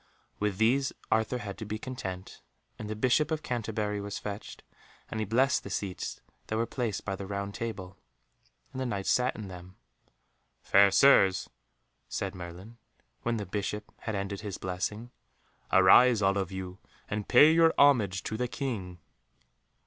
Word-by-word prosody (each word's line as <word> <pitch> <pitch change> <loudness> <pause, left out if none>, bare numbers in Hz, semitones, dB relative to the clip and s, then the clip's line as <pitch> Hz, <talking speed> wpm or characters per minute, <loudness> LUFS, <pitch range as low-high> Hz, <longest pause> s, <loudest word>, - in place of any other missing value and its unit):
With 105 -2 -1
these 130 +5 +2 0.2
Arthur 110 +3 +1
had 100 -5 -7
to - - -5
be 105 +1 -3
content, 95 -7 -7 0.4
and 105 - -6
the 110 - -3
Bishop 130 +7 +2
of 155 -1 -2
Canterbury 105 -3 -2
was 100 0 -5
fetched, 105 0 -7 0.5
and 110 - -3
he 110 - -2
blessed 130 +5 +2
the - - -7
seats 95 -1 -4 0.3
that 110 - -2
were 115 - +1
placed 115 -5 -3
by 95 - -2
the 95 0 -7
Round 100 0 -4
Table, 95 -5 -6 0.7
and 130 - -5
the - - -1
Knights 100 -5 -1
sat 125 +1 +2
in 105 -2 -7
them. 90 0 -11 0.9
"Fair 100 0 +6
Sirs," 100 -4 +5 0.6
said 100 -1 -3
Merlin, 90 +6 -10 0.4
when 120 -1 -1
the 105 - -4
Bishop 105 +2 -4
had 110 -3 -4
ended 100 0 -3
his 105 -3 -5
blessing, 105 +6 -4 0.6
"arise 105 +4 +6
all 100 +1 +3
of 95 -1 -3
you, 95 0 -6 0.3
and 105 0 -4
pay 150 +2 +7
your 165 0 +5
homage 110 -10 +4
to 110 - -4
the 125 +1 -1
King." 110 -10 -4
105 Hz, 165 wpm, -29 LUFS, 95-120 Hz, 0.9 s, pay